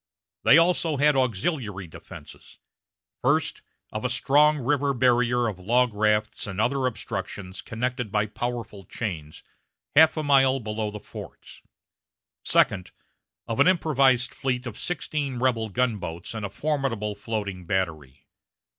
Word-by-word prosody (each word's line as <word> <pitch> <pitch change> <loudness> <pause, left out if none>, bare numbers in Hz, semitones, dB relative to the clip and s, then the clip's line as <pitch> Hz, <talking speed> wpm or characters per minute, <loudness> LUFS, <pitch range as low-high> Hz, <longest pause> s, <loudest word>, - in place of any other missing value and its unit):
They 155 - +7
also 165 -2 +2
had 145 +1 +4
auxiliary 115 - -1
defenses: 80 - -13 0.6
first, - - +1 0.3
of 110 - -4
a 125 - 0
strong 145 +4 +4
river 140 +1 0
barrier 120 -1 +3
of 100 -5 -4
log 120 +5 +2
rafts 105 0 0
and 100 0 -5
other 130 +3 +1
obstructions 95 -5 -5
connected 125 -1 -3
by 105 0 +1
powerful 115 -2 -5
chains, 80 -9 -6 0.5
half 160 +2 +6
a 155 - -1
mile 135 -2 +4
below 110 -2 -3
the 105 0 -7
forts; - - -11 0.8
second, 95 -3 +2 0.6
of 115 - -4
an - - +6
improvised 135 -8 +3
fleet 130 -2 -2
of 120 -4 -6
sixteen 150 -6 -3
rebel 120 -3 0
gunboats 100 -7 -2
and 110 -2 -3
a - - -12
formidable 120 -3 -2
floating 100 -4 -5
battery. 80 -8 -3
120 Hz, 130 wpm, -25 LUFS, 105-135 Hz, 0.8 s, They